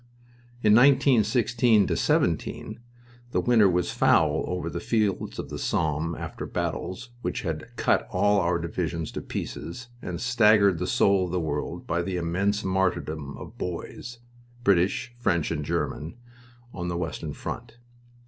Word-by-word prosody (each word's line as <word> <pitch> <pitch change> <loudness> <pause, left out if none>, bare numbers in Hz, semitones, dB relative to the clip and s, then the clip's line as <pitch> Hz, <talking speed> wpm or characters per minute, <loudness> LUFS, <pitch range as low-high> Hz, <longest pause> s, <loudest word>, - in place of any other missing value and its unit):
In 105 -1 +6
1916 120 -4 +4
17 - - 0 0.5
the - - +2
winter 115 -5 +4
was 90 0 0
foul - - +3
over 90 -2 -3
the - - -3
fields 105 -5 -1
of - - -6
the - - -5
Somme 80 +1 0
after - - -6
battles 120 +7 -4
which - - -3
had 80 +3 -4
cut - - +1
all 105 0 +3
our 85 -1 +1
divisions 85 -1 -3
to - - -5
pieces 115 +8 -6
and 85 -1 -5
staggered 105 -6 +4
the 90 - -2
soul 100 -2 +3
of 90 - -6
the 90 - 0
world 75 -3 -3
by 85 +1 0
the 90 +1 -3
immense 95 +5 0
martyrdom 85 -6 -1
of - - -11
boys 90 +7 -6 0.5
British, 100 +4 +2
French, 85 -10 +1
and 75 -2 -2
German 80 0 -3 0.6
on 90 -1 -4
the 85 -1 -2
western 80 -3 -4
front. 115 +6 -7
90 Hz, 145 wpm, -26 LUFS, 85-110 Hz, 0.6 s, In